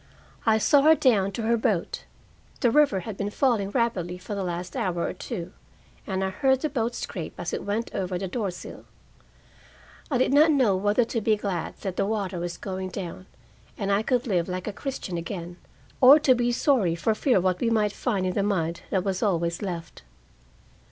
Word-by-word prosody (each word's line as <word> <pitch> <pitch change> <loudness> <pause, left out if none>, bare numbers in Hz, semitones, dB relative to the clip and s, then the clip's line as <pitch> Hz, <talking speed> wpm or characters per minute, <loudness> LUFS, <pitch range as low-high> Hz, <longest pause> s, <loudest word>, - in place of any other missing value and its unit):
I 220 0 +5
saw 280 +6 +4
her 315 +3 +6
down 210 -10 +3
to 225 - -4
her 230 +1 +2
boat. 215 -6 -1 0.6
The 240 - +4
river 280 -10 +3
had 205 +2 -7
been 200 - -2
falling 220 -4 +1
rapidly 200 -6 -1
for 185 +3 -7
the 200 -1 -2
last 180 +2 -4
hour 190 -9 -1
or - - -2
two, 180 0 -6 0.5
and 190 -2 -1
I 190 - -1
heard 265 +6 +2
the 310 - 0
boat 235 -3 -1
scrape 170 -8 -5
as 175 -1 -4
it - - -3
went 210 +3 -2
over 185 -1 -2
the 190 +1 -3
door 205 +1 -2
sill. 180 - -9 1.2
I 275 - +1
did 255 +1 +2
not 305 +3 +6
know 260 -10 +3
whether 205 +5 +2
to 230 0 -2
be 215 +1 +3
glad 195 -5 -4
that 190 -2 -4
the - - +1
water 200 -4 -2
was 175 0 -4
going 190 -1 -5
down 185 0 -7 0.5
and 200 -1 -1
I 200 +1 +3
could 245 +2 0
live 185 -6 0
like 180 0 -4
a 210 - -4
Christian 200 -9 -4
again, 175 0 -6 0.4
or 265 +3 +10
to 275 -3 +5
be 245 0 +1
sorry, 235 - +2
for 220 +6 +1
fear 250 +2 +2
of 180 - +1
what 185 -1 +1
we 235 - +1
might 215 -2 +2
find 200 -7 -1
in 185 - 0
the 200 - 0
mud 170 -5 -1
that 190 -2 0
was 190 -2 -2
always 170 -5 0
left. 175 -5 -6
200 Hz, 205 wpm, -26 LUFS, 180-235 Hz, 1.2 s, or